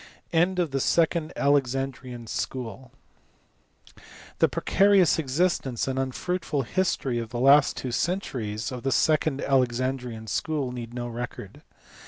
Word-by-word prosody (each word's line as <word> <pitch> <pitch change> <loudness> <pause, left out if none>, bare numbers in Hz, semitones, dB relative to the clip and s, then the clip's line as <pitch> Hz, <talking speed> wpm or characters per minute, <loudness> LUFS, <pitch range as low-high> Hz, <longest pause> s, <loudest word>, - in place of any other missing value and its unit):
End 175 +3 +3
of 170 -5 0
the 135 - 0
second 165 +2 +1
Alexandrian 135 -3 0
School. 125 +2 -5 1.5
The - - +4
precarious 195 -3 +3
existence 140 -4 0
and 130 0 -1
unfruitful 145 +3 -2
history 135 -5 -1
of 115 -1 -5
the 120 0 -4
last 140 +3 +5
two 130 - -4
centuries 125 - -2
of 125 -1 -5
the 135 - -1
second 155 0 +2
Alexandrian 125 -3 0
School 140 +3 -2
need 120 -1 -7
no 120 -1 -3
record. 120 +1 -7
135 Hz, 125 wpm, -26 LUFS, 120-155 Hz, 1.5 s, last